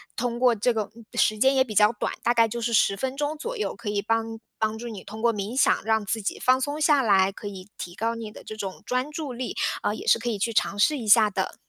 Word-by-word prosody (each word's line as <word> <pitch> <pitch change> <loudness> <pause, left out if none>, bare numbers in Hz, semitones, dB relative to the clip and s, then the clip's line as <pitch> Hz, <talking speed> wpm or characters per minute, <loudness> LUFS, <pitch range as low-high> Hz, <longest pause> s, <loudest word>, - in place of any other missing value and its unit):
通 240 0 -2
过 250 -2 +4
这 235 +3 +1
个 215 -3 -2 0.2
时 215 - +2
间 265 +5 +4
也 260 - +5
比 235 -5 -7
较 210 +1 +6
短， - - -3
大 240 - +3
概 230 -1 +4
就 235 +2 -5
是 235 +1 -1
10 200 -2 +3
分 260 +6 -3
钟 295 +2 -2
左 475 +11 -5
右， 425 - -2
可 230 -3 -6
以 205 -1 0
帮 225 +1 -1 0.2
帮 220 0 0
助 240 +2 -7
你 215 -5 -7
通 215 +2 -9
过 235 0 +3
冥 210 +5 -3
想 - - +3
让 220 -1 +1
自 220 +2 -2
己 200 - -3
放 255 +1 +3
松 290 +3 -2
下 295 -2 +4
来， 195 -5 +3
可 205 - -9
以 190 -2 -8
提 175 - -7
高 230 +3 -1
你 225 -2 -7
的 - - -12
这 215 - -8
种 195 -3 -6
专 255 +4 -1
注 295 -3 -5
力， 245 +1 -5 0.3
啊， 205 - 0
也 - - -7
是 - - +6
可 240 +1 -3
以 220 - -2
去 230 +3 -1
尝 205 - +1
试 300 +8 +3
一 230 -5 -6
下 215 0 +6
的。 190 -2 -3
225 Hz, 295 characters per minute, -25 LUFS, 210-250 Hz, 0.3 s, 较